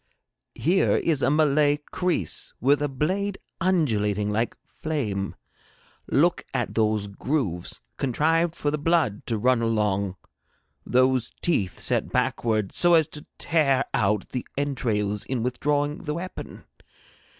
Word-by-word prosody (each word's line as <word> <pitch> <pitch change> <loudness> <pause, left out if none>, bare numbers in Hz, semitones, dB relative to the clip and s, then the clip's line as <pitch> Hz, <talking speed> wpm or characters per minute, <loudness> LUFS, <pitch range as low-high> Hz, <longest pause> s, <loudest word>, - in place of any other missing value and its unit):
Here 180 +5 +2
is 155 -5 +1
a - - +3
Malay 150 -1 +3 0.2
kreese 175 - -1
with 140 +3 +3
a 145 - 0
blade 190 +9 -1 0.2
undulating 105 - +1
like 115 +3 -1
flame. 110 -12 -3 0.7
Look - - +2
at - - -1
those 110 -2 +1
grooves 100 - -2 0.2
contrived 160 +6 +1
for 145 - -1
the 150 - -2
blood 155 -9 +1
to 115 - 0
run 125 +2 +2
along, 105 -4 0 0.7
those 130 -1 +2
teeth 105 - 0
set - - 0
backward 110 -4 0
so 175 -1 +5
as 160 -3 +4
to 150 - -10
tear 145 -5 +2
out 105 -1 +1
the 125 - -4
entrails 110 -8 -1
in 125 -1 -2
withdrawing 145 +4 0
the 150 -2 -4
weapon. 185 +2 -7
130 Hz, 130 wpm, -25 LUFS, 105-155 Hz, 0.7 s, so